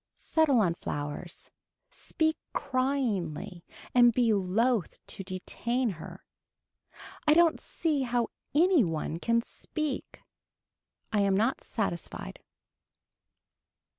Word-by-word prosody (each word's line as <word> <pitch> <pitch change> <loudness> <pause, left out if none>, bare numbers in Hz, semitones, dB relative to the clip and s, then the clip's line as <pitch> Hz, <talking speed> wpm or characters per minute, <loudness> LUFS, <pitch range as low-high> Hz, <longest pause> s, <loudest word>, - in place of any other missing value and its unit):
Settle 295 -7 +3
on 175 -5 +2
flowers, 145 -3 -5 0.4
speak 315 0 -1 0.2
cryingly 235 - -1 0.3
and 240 -1 +7
be 235 -2 +3
loath 205 +2 +1
to 195 - -6
detain 230 +6 -2
her. 165 -3 -10 1.0
I 300 - +6
don't 335 -1 +5
see 310 -4 -1
how 240 -2 0 0.3
any 340 -2 +5
one 165 -1 -2
can 230 +4 +2
speak. 305 +1 -5 0.9
I 210 - +3
am 200 -1 +3
not 225 +5 +1
satisfied. 170 - -4
235 Hz, 100 wpm, -29 LUFS, 185-270 Hz, 1.0 s, and